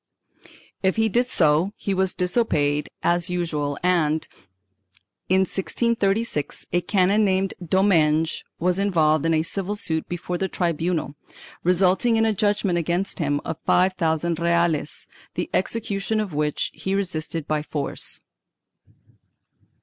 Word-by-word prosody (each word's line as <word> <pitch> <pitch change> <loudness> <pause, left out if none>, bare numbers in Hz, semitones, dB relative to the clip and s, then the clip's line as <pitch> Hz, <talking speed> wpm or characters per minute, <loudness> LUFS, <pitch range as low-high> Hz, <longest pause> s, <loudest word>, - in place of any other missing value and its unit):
1 - - -20 0.3
If 190 -1 +2
he 220 0 +2
did 245 +4 +2
so, 165 -2 +2
he 200 - -2
was 190 0 +1
disobeyed 155 -7 +1
as 175 +1 +1
usual 155 -5 -2
and, 160 -4 +1 1.0
in 190 +1 +4
1636, 200 - -1
a 175 - +3
canon 195 +3 +2
named 190 -1 +1
Domenge 165 -3 +2
was 180 +2 0
involved 160 -6 +2
in 165 - +2
a 155 - +2
civil 195 +4 -3
suit 160 -6 -2
before 175 0 -4
the 190 - 0
tribunal, 170 -3 -1 0.5
resulting 185 +6 +3
in 225 0 +3
a 220 - +2
judgement 205 -3 +1
against 175 +5 -2
him 145 -3 0
of 160 0 -4
five 185 +1 +3
thousand 165 -1 0
reales, 170 -3 0 0.3
the - - -3
execution 215 -1 -1
of 205 -6 -3
which 150 0 -1
he 190 +1 -2
resisted 165 -5 -3
by 155 -1 0
force. 150 -2 -4
180 Hz, 135 wpm, -23 LUFS, 160-195 Hz, 1.0 s, in